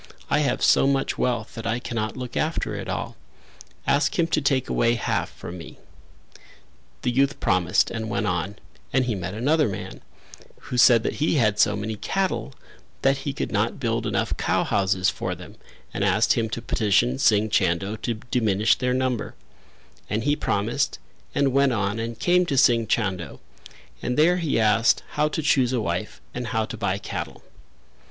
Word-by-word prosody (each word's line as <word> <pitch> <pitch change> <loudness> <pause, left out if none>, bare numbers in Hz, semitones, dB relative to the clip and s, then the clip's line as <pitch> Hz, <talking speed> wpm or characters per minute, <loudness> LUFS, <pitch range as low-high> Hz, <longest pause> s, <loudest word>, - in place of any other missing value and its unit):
I - - +4
have - - 0
so - - +5
much 135 -1 0
wealth 120 -3 -1
that 115 0 -6
I 115 +1 0
cannot 115 -1 -4
look 125 -2 -6
after 160 +1 -1
it - - -5
all; - - -4 0.7
ask 140 +1 +1
him 170 - +3
to 155 - +1
take 135 -2 +1
away 115 0 +2
half 115 - -1
from 90 +1 -9
me." 80 - -11 1.3
The - - +1
youth 140 +3 +1
promised 90 -5 +2
and 110 -1 -4
went 120 - -1
on 90 +3 -2 0.4
and 130 -1 +2
he 120 - -1
met 90 0 -5
another 145 +4 +2
man 100 - -7 0.6
who 125 - -5
said 120 -2 +6
that - - -2
he 160 - +2
had 105 -6 +2
so 105 - +4
many 105 +1 -4
cattle 190 - -2 0.5
that 135 0 +3
he 140 +1 -3
could 140 - -4
not 105 +5 0
build 115 -2 -1
enough 100 -2 -1
cow - - +1
houses 95 -1 +1
for - - -4
them - - -12 0.4
and - - -1
asked - - +3
him 115 -1 -1
to 115 +1 -5
petition 120 +4 +1
Singh 110 -4 +3
Chando 95 +2 +1
to 120 +1 -3 0.2
diminish 110 -3 +3
their 125 0 -1
number; 130 -3 -1 0.7
and 110 +1 -1
he 145 +1 +2
promised, 115 +3 -1 0.4
and 135 -2 +2
went 140 -1 +3
on 105 0 -1
and 115 0 -4
came 180 0 +2
to 140 - -1
Singh 115 -4 +4
Chando, 95 -7 -1 0.6
and 125 - -2
there 170 +4 +4
he 165 -9 0
asked 110 +1 +3
how 150 +1 +1
to 155 +1 -3
choose 130 -4 +3
a 125 - +1
wife 105 - -3
and 125 -1 -4
how 110 -2 0
to 115 - -7
buy 100 -4 -1
cattle. 100 - -6
115 Hz, 180 wpm, -24 LUFS, 105-135 Hz, 1.3 s, said